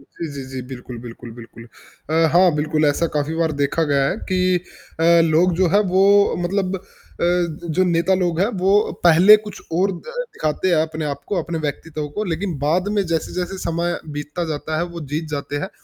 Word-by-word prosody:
जी, 160 +4 -8
जी, 140 - -5
जी। 130 -1 -5
बिल्कुल, 125 -2 -8
बिल्कुल, 120 0 -10
बिल्कुल, 115 0 -12 0.5
अ, 165 +1 +3
हाँ, 180 +1 +6
बिल्कुल 155 +1 0
ऐसा 145 +4 +1
काफ़ी 150 +2 -1
बार 160 -1 +1
देखा 140 +4 +1
गया 140 -1 +3
है 185 - -2
कि 185 - +1 0.6
अ, - - +2 0.3
लोग 175 +4 +3
जो 185 - +5
हैं 205 - +6
वो 190 +1 +5 0.4
मतलब 190 +1 -1
अ, - - -9 1.0
जो 185 - +5
नेता 170 +1 +2
लोग 170 -1 0
हैं 195 - +4 0.2
वो 205 +2 +3
पहले 175 +5 +8
कुछ 210 - -8
और 190 +4 +2
द - - -12 0.2
दिखाते 185 - -2
हैं 175 - +3
अपने 160 0 -4
आपको, 145 +5 -3
अपने 165 +1 -4
व्यक्तित्व 150 +1 -5
को 215 - -1
लेक़िन 175 -1 -3
बाद 165 +7 +1
में 200 - +3
जैसे-जैसे 175 +3 -3
समय 170 0 -2 0.2
बीतता 150 +4 -4
जाता 155 0 -3
है, 170 - 0
वो 170 -1 -8
जीत 155 +2 -1
जाते 145 0 -4
हैं। - - -6
165 Hz, 195 wpm, -21 LUFS, 150-185 Hz, 1.0 s, पहले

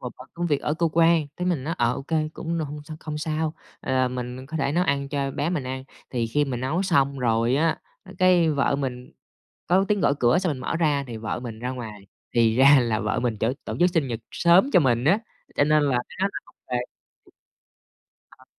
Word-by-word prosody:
một 125 - -6
phần 130 +2 -12
công 175 0 -2
việc 145 -4 +1
ở 150 - -1
cơ 165 0 +1
quan". 165 -2 +4
Thế 180 - -3
mình 165 -7 -1
nói: 165 +2 -2
"Ờ, 120 0 +2
ô - - -6
kê, 155 +1 -1
cũng 170 +1 -4
n - - -1
hông 150 0 -5
sao 155 0 -8
không 150 -1 -5
sao.", 155 0 -2 0.3
à, 130 -1 +1
mình 125 +1 -6
có 160 +3 -5
thể 140 -1 0
nấu 180 +2 +2
ăn 140 0 0
cho 140 -1 -2
bé 145 +4 -2
mình 150 -7 -2
ăn. 130 +1 -5 0.3
Thì 120 -3 -1
khi 145 +6 +1
mình 125 -3 -4
nấu 155 +9 0
xong 140 -7 +2
rồi 115 0 +1
á, 160 +1 +1 0.4
cái 180 -3 +4
vợ 140 -1 +1
mình 125 -3 -5 0.5
có 185 +3 +3
tiếng 205 -1 +1
gõ - - +3
cửa 120 +6 +4
xong 180 -5 0
mình 130 - -7
mở 160 - -2
ra 145 -4 +1
thì 115 -2 -6
vợ 110 +2 -4
mình 115 -3 -7
ra 125 +2 -3
ngoài, 110 -6 -8 0.3
thì 115 -1 +3
ra 140 +1 +7
là 115 -3 0
vợ 105 -1 -1
mình 120 -3 -1
chở 115 +4 +1
tổ - - -4
chức 180 0 +5
sinh 160 -6 0
nhật 115 -1 -4
sớm 180 +10 +4
cho 180 - +6
mình 120 -3 +2
á, 190 +8 +4 0.4
cho 145 - +4
nên 155 0 +3
là 140 - +1
mới 125 -1 -2
nói 195 - +2
là - - -5
hông - - -21 0.2
về. 125 0 +1 1.5
Ờ, - - -20
140 Hz, 240 wpm, -24 LUFS, 125-160 Hz, 1.5 s, ra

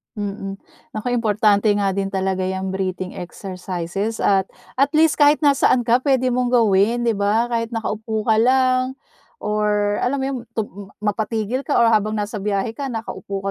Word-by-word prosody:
Mm. 200 -1 -4 0.4
Naku 215 +3 -2
importante 215 -2 +2
nga 200 -1 +1
din 195 0 -2
talaga 190 -1 -1
'yang 190 0 -3
breathing 185 -1 -3
exercises, 185 +3 -5
at 195 -1 +3 0.3
at 275 +1 +4
least 315 0 +3
kahit 290 +1 +5
nasaan 275 -3 +4
ka 235 +2 +3
puwede 260 -2 +1
mong 250 0 0
gawin, 225 0 +3
'di 230 -1 +2
ba? 215 +4 +1
Kahit 230 -1 -1
nakaupo 220 0 -3
ka 220 0 +2
lang 255 +1 +3 0.6
or 210 -1 0
alam 265 +3 0
mo 265 - -2
'yon, 270 -1 -2 0.2
tum 205 -3 -5
mapatigil 220 +3 -1
ka 285 - 0
o 235 - +5
habang 215 0 +2
nasa 210 0 -3
biyahe 205 +2 -1
ka 275 +3 -5
nakaupo 200 -4 -5
215 Hz, 165 wpm, -21 LUFS, 195-245 Hz, 0.6 s, kahit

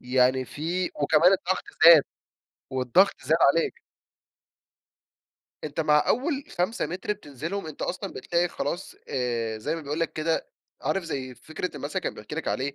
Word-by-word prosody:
يعني 130 +1 +2
في 170 +7 -2
وكمان 165 +5 +4
الضغط 185 0 0 0.2
زاد، 165 -3 +10 0.7
والضغط 130 +10 +3
زاد 155 +5 +3
عليك. 165 +3 +3 1.8
أنتَ 155 +1 -3
مع 150 -1 +4
أول 280 +1 0
5 185 +7 0
مِتر 185 +4 -3
بتنزلهم، 165 +1 -6
أنتَ 155 - -7
أصلًا 185 +2 -3
بتلاقي 175 +1 0
خلاص 175 +5 -4
آآ 115 -4 -2
زي 110 - -2
ما 165 - -5
بيقول 150 +2 -4
لَك 165 - 0
كده، 160 - -1 0.3
عارف 195 -2 0
زي 130 -5 -4
فكرة 160 +5 -6
المثل 145 +6 -3
كان 185 - -3
بيحكي 105 +8 -8
لك 160 - -3
عليه، 135 +2 -2
160 Hz, 150 wpm, -26 LUFS, 135-180 Hz, 1.8 s, زاد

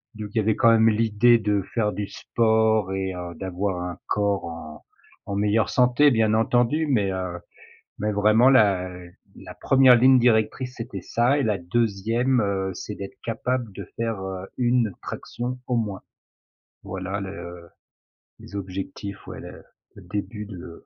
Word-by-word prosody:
donc 105 -1 -6
il - - -1
y - - +4
avait 110 +1 +1
quand 115 - +5
même 115 0 +5
l'idée 115 +2 +4
de 105 -2 0
faire 105 -3 0
du 105 -1 -4
sport 110 -3 +1
et 95 -1 -2
heu, 90 -1 -6
d'avoir 95 0 -3
un 90 0 -5
corps 100 -1 0
en 80 -2 -9 0.4
en 100 - -4
meilleure 105 +2 +2
santé 125 +3 +4
bien 110 -2 +2
entendu. 120 +7 +2
Mais 105 -8 +1
heu, 90 -2 -4 0.6
mais 105 0 -1
vraiment 110 +5 +4
la 95 -7 +3 0.5
la - - -10
1re 130 -2 +5
ligne 130 +2 +6
directrice 120 +2 +1
c'était 110 -5 -6
ça 120 +9 +1
et 140 - +1
la 105 -3 +1
2e, 115 +6 0
heu, 95 -1 -1
c'est 105 - -7
d'être 100 -1 -8
capable 120 0 -2
de - - -7
faire, 115 -4 -2
heu, 95 0 -6
1 120 -4 +1
traction 125 +1 -5
au 125 - 0
moins. 105 -4 -3 0.8
Voilà 95 +1 -4
le 85 -3 -8 0.7
les - - -12
objectifs, 95 +1 -6
ouais - - -8
le - - -11 0.3
le 100 - -12
début 105 +3 -5
de 85 -4 -10
105 Hz, 160 wpm, -24 LUFS, 95-120 Hz, 0.8 s, ligne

